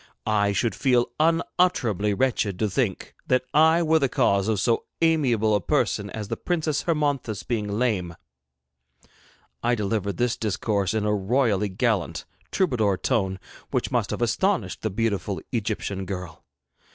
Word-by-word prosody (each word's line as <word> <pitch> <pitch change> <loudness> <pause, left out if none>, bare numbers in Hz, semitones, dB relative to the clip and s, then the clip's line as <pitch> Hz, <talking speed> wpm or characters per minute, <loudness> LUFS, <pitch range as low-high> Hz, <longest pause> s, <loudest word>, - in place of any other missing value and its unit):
I 105 -2 +2
should 110 +4 0
feel 125 -3 +2
unutterably 155 - +1
wretched 110 -6 0
to 110 +1 0
think 105 -4 -1
that 130 0 +2
I 160 +3 +5
were 160 0 +3
the 135 -3 +1
cause 100 -3 +2
of 110 -3 +1
so 115 +3 +1
amiable 130 -10 +2
a 105 - +2
person - - 0
as 105 -2 -6
the 115 - -2
Princess 155 0 -1
Hermonthis 145 - -1
being 110 -4 -2
lame.' 100 -9 0 1.5
I 120 +1 +2
delivered 100 -2 -2
this 120 -1 0
discourse 105 -1 -1
in 105 -1 0
a 105 - +2
royally 105 0 +1
gallant, 95 - -1 0.3
troubadour 115 - +1
tone 95 -6 0 0.3
which - - -1
must - - 0
have - - -2
astonished - - 0
the - - -1
beautiful 100 -2 -1
Egyptian 100 -5 -3
girl. 90 -3 -6
110 Hz, 145 wpm, -25 LUFS, 100-130 Hz, 1.5 s, I